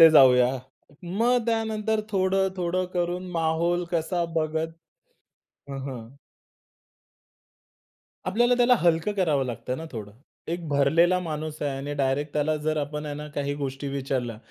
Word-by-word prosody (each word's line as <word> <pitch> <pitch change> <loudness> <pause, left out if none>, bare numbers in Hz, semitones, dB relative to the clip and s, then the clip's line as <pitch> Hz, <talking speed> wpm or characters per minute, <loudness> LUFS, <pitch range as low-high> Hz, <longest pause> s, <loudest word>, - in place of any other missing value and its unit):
इथे 165 0 +11
जाऊया. 125 -4 +7 0.5
मग 225 +8 +2
त्यानंतर 220 -1 0
थोडं-थोडं 190 -2 +1
करून 175 +1 -1
माहोल 170 +1 +1
कसा 170 +1 0
बघत 160 0 0 1.0
हं, 135 - -4
हं. 125 0 -8 2.1
आपल्याला 240 +6 +3
त्याला 245 0 +5
हलकं 170 +3 +2
करावं 155 -9 +1
लागतं 125 +1 -4
ना 160 - -6
थोडं. 105 -4 -7 0.4
एक 170 0 -3
भरलेला 160 +6 +4
माणूस 155 -2 -5
आहे 145 -1 0
आणि 140 +2 -4
डायरेक्ट 145 +1 0
त्याला 150 +1 +1
जर 155 +1 -1
आपण 150 +1 -3
आहे 145 -1 -4
ना 150 +1 -6
काही 145 0 -1
गोष्टी 140 0 -4
विचारल्या. 130 -4 -2
160 Hz, 130 wpm, -26 LUFS, 140-180 Hz, 2.1 s, इथे